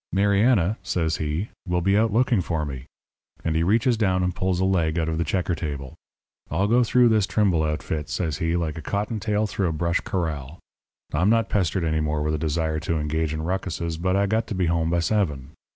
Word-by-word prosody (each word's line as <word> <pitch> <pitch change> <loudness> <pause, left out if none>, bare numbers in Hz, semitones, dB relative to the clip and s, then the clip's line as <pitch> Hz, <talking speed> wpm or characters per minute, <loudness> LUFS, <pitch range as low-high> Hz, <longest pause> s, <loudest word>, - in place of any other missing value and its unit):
'Mariana,' 100 +1 +3
says 80 -3 -1
he, 80 +7 -2 0.2
'will 90 0 +1
be 95 +3 +2
out 110 +1 +3
looking 115 -2 +2
for 80 -3 -2
me.' 70 -1 -7 0.6
And 80 -1 0
he 80 - +2
reaches 115 +7 +2
down 95 -4 +1
and 90 0 0
pulls 95 0 -1
a 95 - +2
leg 85 -4 +1
out 80 -1 0
of 80 0 -1
the - - +2
checker 90 0 -1
table. 70 -5 -5 0.6
'I'll 90 +6 +1
go 120 +2 +4
through 120 +1 +4
this 110 -3 +2
Trimble 95 -3 +2
outfit,' 75 -1 -2
says 80 -5 -2
he, 80 +1 0
'like 80 -2 -2
a - - -6
cottontail 105 - -1
through 100 -2 -1
a - - 0
brush 85 +2 0
corral. 80 -6 -3 0.6
I'm 85 +7 +2
not 115 -1 +2
pestered 95 -3 0
any 80 -1 0
more 75 -1 -1
with 75 0 0
a 75 - -1
desire 80 0 -1
to 80 +2 -1
engage 75 +1 -1
in 80 0 -3
rucuses, 85 -2 -2
but 90 +3 0
I 100 +1 +3
got 110 +3 0
to 105 - -4
be 90 -1 +1
home 80 -1 +1
by 85 0 +1
seven. 80 -8 -1
85 Hz, 215 wpm, -24 LUFS, 80-100 Hz, 0.6 s, go